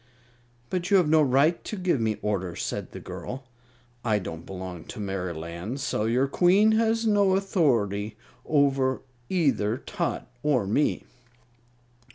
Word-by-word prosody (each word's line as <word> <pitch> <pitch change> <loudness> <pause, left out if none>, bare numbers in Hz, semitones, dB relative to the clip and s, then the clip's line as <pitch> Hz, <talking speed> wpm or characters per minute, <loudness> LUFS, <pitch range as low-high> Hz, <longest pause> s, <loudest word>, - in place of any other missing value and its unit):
"But 180 0 -1
you 200 - +6
have 180 -4 +3
no 155 +1 +5
right 145 +4 +3
to - - -5
give 180 -9 +1
me 110 -1 0
orders," 95 -4 -2
said - - -4
the - - -8
girl. 130 +2 -7 0.6
"I 110 -3 +2
don't 85 -4 -6
belong 90 -3 -7
to - - -9
Merryland, 90 - -4
so 110 -5 -1
your 125 +4 +2
Queen 190 +8 +4
has 225 +1 +2
no 205 -3 +4
authority 115 - +1 0.3
over 135 -3 +2 0.3
either 135 - +1
Tot - - -3
or 135 -8 +2
me." 115 +10 +1
130 Hz, 140 wpm, -26 LUFS, -, 0.6 s, you